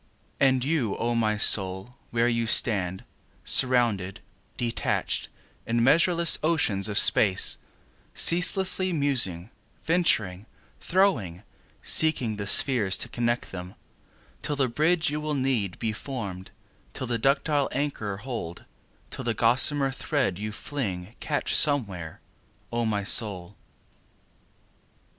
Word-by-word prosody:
And 130 -2 +2
you, 140 -9 -1
O 120 +1 -1
my 110 -2 0
Soul, 95 +3 +3
where 120 0 0
you 115 -1 -1
stand, 95 -5 +2 0.4
Surrounded, 115 -7 +2 0.4
surrounded, 120 -1 -2 0.4
in 115 0 0
measureless 170 +5 +3
oceans 115 - 0
of 100 - -2
space, 95 -3 +3 0.6
Ceaselessly 185 +1 +3
musing, 120 - 0 0.3
venturing, 110 - 0 0.3
throwing,—seeking 125 - -1
the 100 -1 -5
spheres, 105 -4 +4
to - - -4
connect 120 0 -2
them; 90 0 -9 0.7
Till 145 - -2
the 135 -2 +1
bridge 160 +7 0
you 150 +1 -4
will 150 -1 -2
need, 120 - -1
be 110 -1 -3
form'd—till 105 -1 -9
the 120 -2 -2
ductile 140 +2 0
anchor 125 -8 -3
hold; 105 -7 -7 0.5
Till - - -6
the 115 -2 -2
gossamer 135 +5 +1
thread 135 - -2
you 105 +1 -5
fling, 105 -6 -5
catch 145 - -3
somewhere, 100 - +1 0.5
O 120 0 -1
my 105 -2 -2
Soul. 100 -3 +1
120 Hz, 110 wpm, -25 LUFS, 100-145 Hz, 0.7 s, spheres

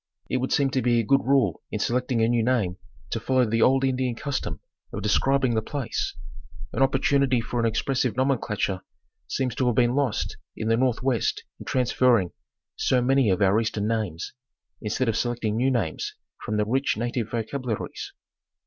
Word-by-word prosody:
It - - +2
would 130 +1 -2
seem 140 -2 +2
to 130 - +1
be 120 0 +3
a - - +1
good 135 +4 +4
rule 130 - +2
in - - -3
selecting 125 -1 0
a - - +4
new 120 0 +2
name 110 -7 +1 0.3
to 115 - -1
fol 130 +4 -2
low 130 -1 +5
the 115 +1 0
old 135 +3 +4
Indian 130 -2 0
custom 130 - -3 0.3
of 100 - -5
describing 130 +4 +2
the 110 - +1
place. 125 0 -3 0.6
An - - -2
oppor 135 0 +4
tunity 135 -2 +2
for 120 +1 -3
an 115 - +2
expressive 125 +2 0
nomenclature 110 -8 0 0.5
seems 130 -3 -1
to 130 +1 0
have 120 - +2
been 120 -1 +3
lost 135 -5 -1 0.2
in 110 - -2
the 115 - +4
north 125 0 +1
west 130 -4 0 0.2
in - - -9
transferring 125 -6 +2 0.4
so 130 - +2
many 130 -1 +3
of 95 +2 +2
our 100 +3 +4
eastern 110 -2 -2
names, 105 -8 -2 0.5
instead 110 +4 -1
of 115 - +1
selecting 120 -3 -1
new 125 +4 +2
names 115 -11 -2 0.3
from 105 - -2
the 105 - +2
rich 130 +4 0
native 120 0 -2
vocabularies. 120 0 -4
120 Hz, 185 wpm, -25 LUFS, 110-130 Hz, 0.6 s, low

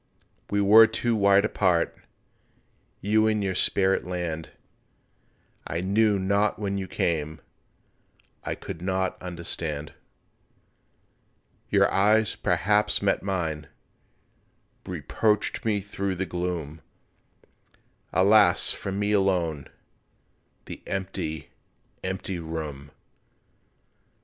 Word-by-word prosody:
We 100 0 +1
were 110 +3 +8
too 115 +1 -1
wide 100 0 +4
apart— 90 -6 +1 1.1
You 110 +2 +3
in 105 -1 +1
your 95 -1 -1
spirit 95 +1 +2
land— 85 -3 -4 1.2
I 85 +2 -2
knew 105 +2 +2
not 100 +2 +1
when 100 -2 -2
you 95 - -4
came, 80 -3 -1 1.0
I - - -3
could 80 - -8
not 95 0 -1
understand. 85 -4 -5 1.8
Your - - +4
eyes 105 +2 +3
perhaps 105 +3 +1
met 100 - +2
mine, 80 -6 -3 1.2
Reproached 105 0 -1
me 105 -2 +1
through 100 -1 -3
the 95 +2 -2
gloom, 85 -4 -4 1.3
Alas, 100 -1 +5
for 100 - -5
me 105 +2 -1
alone 90 -8 +1 1.0
The - - -9
empty, 95 -5 -4 0.5
empty 95 -1 -3
room! 75 -4 -6
95 Hz, 95 wpm, -26 LUFS, 85-100 Hz, 1.8 s, were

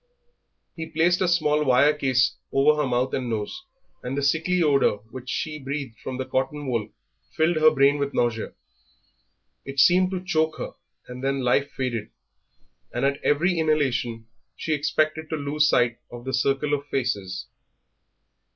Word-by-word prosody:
He 160 -1 -5
placed 165 +3 +2
a 185 - +3
small 150 -4 +2
wire 140 +2 +4
case 130 -3 +1 0.2
over 150 +2 +3
her 145 - 0
mouth 125 +1 0
and 125 -2 -2
nose, 115 - -4 0.4
and 125 +3 -4
the 140 - -1
sickly 165 +5 +2
odour 140 -8 +3
which 130 0 -8
she 150 +1 -3
breathed 135 -3 -5
from 130 - -5
the 130 - -3
cotton 135 +3 -2
wool 115 -4 -1 0.5
filled 160 +1 +2
her 155 0 +7
brain 140 -1 +3
with 140 0 -1
nausea; 120 -4 -1 1.1
it 135 0 -5
seemed 180 +6 +5
to 185 -1 -5
choke 160 -2 0
her, - - -5 0.4
and 125 +1 -8
then 135 0 0
life 130 +3 +2
faded, 120 -5 -2 0.8
and - - -1
at 140 0 0
every 170 +4 +2
inhalation 130 -7 0 0.3
she 160 - -2
expected 155 +1 0
to - - -1
lose 150 +1 +1
sight 120 -1 +2
of 120 0 -9
the 130 - -3
circle 135 +3 +1
of 145 0 -2
faces. 100 -9 -2
140 Hz, 160 wpm, -24 LUFS, 125-155 Hz, 1.1 s, her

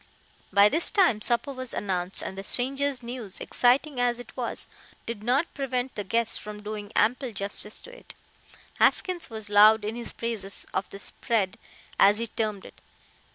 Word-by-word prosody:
By 200 +1 +7
this 315 +10 +2
time 360 - +3
supper 240 +5 +1
was 255 -1 -6
announced, 185 -2 -1
and - - -5
the 195 - -6
stranger's 270 +3 -1
news, 235 -5 -5
exciting 255 +3 +2
as 245 -1 +2
it 245 - -11
was, - - -2 0.4
did 230 -3 -5
not 260 +8 +1
prevent 260 -2 -2
the 205 - -4
guests 230 +4 +1
from 210 0 -9
doing 210 -1 -6
ample 250 +2 +2
justice 200 +1 -1
to - - -12
it. - - -12 0.6
Haskins 360 -5 +2
was 220 -2 -5
loud 210 +1 +7
in 215 +2 -3
his 240 0 -5
praises 215 -4 -4
of 190 - -2
the - - -9
"spread," 215 0 0 0.4
as 200 +1 +6
he 230 - -1
termed 215 -3 -3
it. - - -14
230 Hz, 170 wpm, -27 LUFS, 205-255 Hz, 0.6 s, By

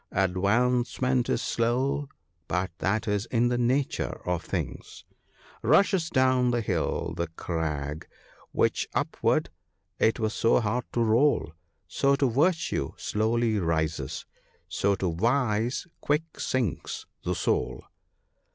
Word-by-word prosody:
Advancement 120 +7 +1
is - - 0
slow 130 +5 0 0.2
— 85 -2 -46
but 90 +1 -1
that 110 +3 0
is 105 +2 0
in 120 0 +2
the 120 - 0
nature 130 +3 0
of 90 -2 0
things, - - -5 0.2
— - - -34
" - - -23
Rushes 170 - +3
down 130 -3 +3
the 120 -1 +1
hill 90 -7 -1
the 85 - -2
crag, 80 -3 -4 0.4
which - - +1
upward - - +1 0.5
'twas 110 -1 +2
so 115 - +3
hard 120 +2 -1
to 120 - +2
roll: 115 - +2 0.3
So 140 0 +2
to 140 0 +2
virtue 145 - +1
slowly 110 0 +1
rises 80 -5 -1 0.2
— - - -36
so 100 0 +1
to 90 -3 -1
vice 115 +3 +1
quick 155 +2 -1
sinks 125 -8 -2 0.2
the - - -1
soul. 60 0 -1
115 Hz, 130 wpm, -27 LUFS, 90-130 Hz, 0.5 s, Rushes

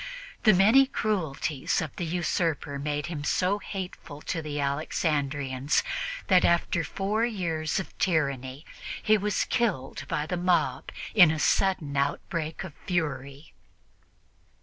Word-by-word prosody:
The 215 - +8
many 225 +9 +6
cruelties 160 - -1
of 155 - -4
the 175 - -2
usurper 160 -4 -1
made 145 0 -2
him 155 -4 -5
so 185 +6 +1
hateful 185 -7 -7
to 165 - -2
the 150 -1 -4
Alexandrians 140 -1 0 0.4
that, 185 -2 +5
after 170 0 +2
four 205 +6 -1
years 170 -9 -1
of 190 - -7
tyranny, 140 -5 0 0.4
he 215 - +5
was 210 0 0
killed 210 - -1
by 150 -2 -1
the 180 +3 -2
mob 170 -7 +1 0.2
in 180 -7 +8
a 160 - 0
sudden 160 -2 +1
outbreak 155 +4 -2
of 180 -6 -8
fury. 150 -5 -3
160 Hz, 125 wpm, -27 LUFS, 145-185 Hz, 0.4 s, The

